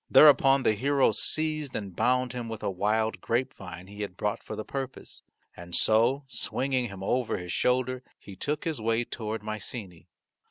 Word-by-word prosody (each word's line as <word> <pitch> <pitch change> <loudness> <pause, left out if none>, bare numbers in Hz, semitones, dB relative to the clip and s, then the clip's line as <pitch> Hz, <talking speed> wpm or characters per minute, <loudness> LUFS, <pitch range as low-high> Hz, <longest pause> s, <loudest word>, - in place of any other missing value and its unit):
Thereupon 135 -2 +7
the 110 - +4
hero 135 +4 +3
seized 155 +4 -1
and 100 -4 -5
bound 125 +2 +2
him 120 -2 -4
with 110 -1 -6
a - - 0
wild 110 +4 0
grapevine 95 -7 -3
he 100 +2 -9
had 100 -3 -5
brought 105 +2 -1
for 110 - -7
the 110 0 -5
purpose. 135 -1 -5 0.3
And 85 0 -5
so 120 +6 +4
swinging 130 +1 -1
him 100 -2 -8
over 125 +4 0
his 90 -1 -6
shoulder 130 +2 +1 0.2
he 100 - -12
took 145 +9 -2
his 160 -8 -2
way 115 +1 +1
toward 110 -2 -5
Mycenae. 105 -4 -6
115 Hz, 170 wpm, -28 LUFS, 105-130 Hz, 0.3 s, Thereupon